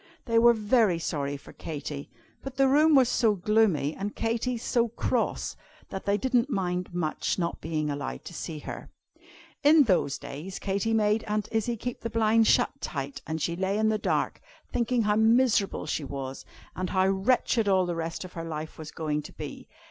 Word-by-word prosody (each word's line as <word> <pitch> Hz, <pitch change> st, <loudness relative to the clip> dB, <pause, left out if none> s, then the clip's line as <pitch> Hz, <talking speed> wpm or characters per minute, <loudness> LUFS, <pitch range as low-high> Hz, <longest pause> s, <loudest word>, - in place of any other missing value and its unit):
They 230 Hz, -1 st, +3 dB
were 235 Hz, 0 st, +6 dB
very 215 Hz, -4 st, +3 dB
sorry 145 Hz, -4 st, -2 dB
for 140 Hz, -, -14 dB
Katy, 145 Hz, -2 st, -6 dB, 0.3 s
but 270 Hz, -1 st, -8 dB
the 270 Hz, -1 st, +5 dB
room 300 Hz, +3 st, +5 dB
was 260 Hz, -3 st, +6 dB
so 225 Hz, -3 st, +2 dB
gloomy, 195 Hz, -7 st, +2 dB
and 205 Hz, +1 st, -4 dB
Katy 235 Hz, +2 st, -1 dB
so 235 Hz, +1 st, +1 dB
cross, 230 Hz, -, -1 dB, 0.3 s
that 190 Hz, -, -6 dB
they 200 Hz, +1 st, +3 dB
didn't 250 Hz, +3 st, +1 dB
mind 180 Hz, -6 st, -2 dB
much 170 Hz, -3 st, -1 dB
not 170 Hz, -2 st, -2 dB
being 155 Hz, -2 st, -2 dB
allowed 65 Hz, -, -5 dB
to -, -, -8 dB
see 160 Hz, -, -5 dB
her. 150 Hz, -, -8 dB, 0.7 s
In 300 Hz, +1 st, +7 dB
those 180 Hz, -, +1 dB
days 170 Hz, +7 st, -7 dB
Katy 200 Hz, +3 st, -1 dB
made 215 Hz, 0 st, +2 dB
Aunt 210 Hz, -1 st, -1 dB
Izzie 225 Hz, +1 st, 0 dB
keep 245 Hz, +3 st, -5 dB
the 230 Hz, -, -3 dB
blinds 225 Hz, 0 st, +3 dB
shut -, -, +4 dB
tight, 140 Hz, -2 st, -4 dB
and 160 Hz, 0 st, -2 dB
she 170 Hz, +2 st, -1 dB
lay 190 Hz, +3 st, 0 dB
in 220 Hz, 0 st, +2 dB
the 215 Hz, -1 st, +1 dB
dark, -, -, -1 dB, 0.3 s
thinking 240 Hz, 0 st, +1 dB
how 210 Hz, 0 st, +2 dB
miserable 225 Hz, -2 st, +3 dB
she 155 Hz, -, -2 dB
was, 135 Hz, -1 st, -6 dB, 0.3 s
and 185 Hz, 0 st, -3 dB
how 185 Hz, -1 st, +2 dB
wretched 215 Hz, +3 st, +2 dB
all 190 Hz, -2 st, +4 dB
the 175 Hz, -, -2 dB
rest 165 Hz, +2 st, -4 dB
of 180 Hz, -, -11 dB
her 165 Hz, -, -5 dB
life 155 Hz, -1 st, -6 dB
was 155 Hz, -1 st, -7 dB
going 150 Hz, -2 st, -2 dB
to -, -, -11 dB
be. -, -, -8 dB
200 Hz, 190 wpm, -27 LUFS, 160-230 Hz, 0.7 s, In